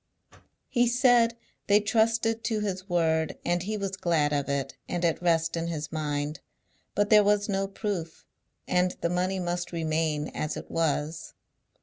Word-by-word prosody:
He 240 0 +2
said, 240 -1 +4 0.3
they 205 +1 +6
trusted 225 +1 +1
to 220 -2 0
his 190 -2 -3
word, 160 -2 +1
and 175 0 +1
he 210 +4 -3
was 195 -1 -3
glad 165 -6 +1
of 145 -1 -1
it, 140 -1 -2
and 175 0 -1
at 165 0 +1
rest 165 -1 +2
in 165 0 -2
his 155 -2 -4
mind; 150 -1 -2 0.6
but 205 +1 +1
there 210 -1 +8
was 205 0 +2
no 195 -1 0
proof, 195 -5 -4 0.4
and 180 0 +1
the 170 - 0
money 185 +2 0
must 175 0 -2
remain 155 -2 -1
as 155 - -3
it - - -9
was. 160 0 -1
175 Hz, 160 wpm, -27 LUFS, 160-205 Hz, 0.6 s, there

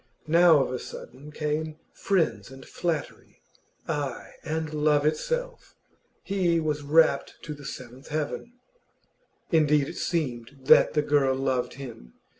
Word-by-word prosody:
Now 165 -2 +6
of - - -4
a 130 - -3
sudden 140 +5 -10
came 150 +1 -3 0.2
friends 190 -9 0
and 135 0 -12
flattery, 165 -4 -4 0.4
ay, 145 -5 -3
and 160 0 -3
love 150 -1 +2
itself. 485 - -2 0.5
He 180 -4 +1
was 150 -2 -1
rapt 155 +3 +3
to 150 - -5
the 145 -1 -12
seventh 130 +1 -9
heaven. 155 +10 -4 1.0
Indeed, 150 -3 +3
it 175 - -7
seemed 135 -6 -2
that 130 - +6
the 150 - +3
girl 140 -3 +2
loved 130 -2 -1
him. 120 - -10
150 Hz, 130 wpm, -26 LUFS, 135-160 Hz, 1.0 s, Now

